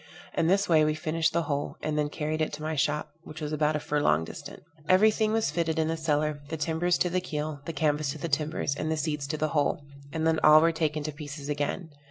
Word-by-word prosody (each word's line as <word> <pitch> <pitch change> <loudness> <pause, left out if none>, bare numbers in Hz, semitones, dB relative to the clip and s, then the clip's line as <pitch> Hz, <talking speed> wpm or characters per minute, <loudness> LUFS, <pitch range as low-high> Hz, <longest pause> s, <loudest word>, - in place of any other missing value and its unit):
In 160 - +2
this 195 +3 +3
way 160 -3 +5
we 155 0 +1
finished 160 +1 0
the 170 0 0
whole, 145 -2 -2
and 155 - -1
then 150 -1 0
carried 155 +1 -3
it 155 - 0
to 150 +1 -6
my 155 0 -2
shop, 150 +1 0
which 155 - -10
was 150 -1 -4
about 155 0 +1
a - - 0
furlong 145 - +1
distant. - - -9 0.3
Every 195 +4 +6
thing 215 0 0
was 225 0 +1
fitted 165 -2 -1
in 160 0 +1
the 165 - 0
cellar, 150 -2 0
the 160 - -3
timbers 165 +3 +1
to 180 - +1
the 185 +1 +1
keel, 150 -4 -4
the 165 - -3
canvas 150 -1 0
to - - -8
the 160 - -4
timbers, 150 -1 -1
and 155 - -3
the 160 - 0
seats 150 -2 -2
to 155 +1 -3
the 155 0 0
whole, 145 -1 0 0.3
and 160 +1 -2
then 160 0 +3
all 150 0 +9
were 165 +1 +4
taken 155 -2 -1
to 155 - -3
pieces 145 -1 -8
again. 150 +3 -2
155 Hz, 255 wpm, -28 LUFS, 150-160 Hz, 0.3 s, all